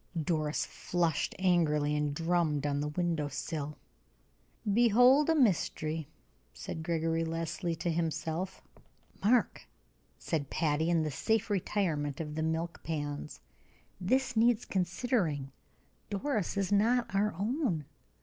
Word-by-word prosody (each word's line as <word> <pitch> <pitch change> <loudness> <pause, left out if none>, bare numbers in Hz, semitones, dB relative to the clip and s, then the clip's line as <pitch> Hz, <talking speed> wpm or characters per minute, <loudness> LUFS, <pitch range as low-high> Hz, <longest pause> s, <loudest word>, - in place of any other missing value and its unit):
Doris 155 -1 0
flushed 170 -4 -1
angrily, 155 -5 +2
and 150 -1 0
drummed 165 -3 +1
on 145 -1 0
the 150 - -1
window 160 -1 -1
sill. 150 +1 -4 1.0
"Behold 245 +6 +5
a 325 - +4
mystery!" 160 - +1 0.5
said 160 - -6
Gregory 165 0 0
Leslie 165 +1 -2
to 170 +1 -2
himself. 165 +2 -2 0.6
"Mark," 235 +4 +2 0.5
said 150 -5 -2
Patty, 160 +1 +1
in 165 -2 +3
the 155 - -2
safe 220 - 0
retirement 165 -8 -1
of 150 -2 -4
the 160 - -2
milk 160 +1 -2
pans, 145 -2 -4 0.6
"this 255 +7 +1
needs 230 0 +3
considering. 175 - -1 0.6
Doris 210 - -1
is 195 0 0
not 230 +4 +2
our 205 0 +1
own. 205 - -1
170 Hz, 120 wpm, -31 LUFS, 155-205 Hz, 1.0 s, Behold